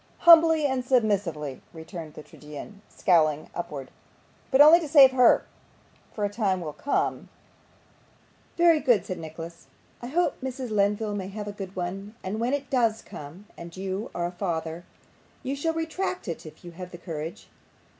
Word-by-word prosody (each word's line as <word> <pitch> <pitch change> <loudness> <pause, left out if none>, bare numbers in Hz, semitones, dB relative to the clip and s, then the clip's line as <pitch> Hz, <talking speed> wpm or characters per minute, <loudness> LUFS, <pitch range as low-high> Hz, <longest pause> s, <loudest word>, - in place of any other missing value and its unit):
'Humbly 325 -2 +7
and 265 -2 0
submissively,' 200 - 0
returned 160 -1 -9
the 155 - -9
tragedian, 150 +9 -11
scowling 155 -5 +2
upwards. 140 -6 -6 0.6
'But 265 - +2
only 310 +4 +9
to 325 - -5
save 280 -3 +8
her, 250 -2 +5 0.7
for 210 - -2
a - - +2
time 200 -3 0
will 155 -4 -6
come 280 - -2 0.6
' - - -34
'Very 340 -2 +5
good,' 245 -10 +2
said 185 - -5
Nicholas; 165 +1 -9 0.3
'I 240 - -6
hope 340 +5 0
Mrs. 260 -2 -5
Lenville 210 +1 +1
may 190 -2 -4
have 205 +1 -6
a - - -3
good 195 -2 -8
one; 195 +4 -5
and 195 +3 -3
when 240 +4 0
it 280 -2 -3
does 230 -4 +1
come, 160 +8 -10
and 170 +1 -10
you 190 +4 -4
are 175 - -1
a 175 - -3
father, 170 -2 -4 0.6
you 270 - -2
shall 325 +3 -1
retract 325 - -3
it 165 -2 -5
if 155 - -14
you 175 - -8
have 180 +1 -9
the 175 - -10
courage. 165 -2 -7
200 Hz, 170 wpm, -26 LUFS, 170-260 Hz, 0.7 s, only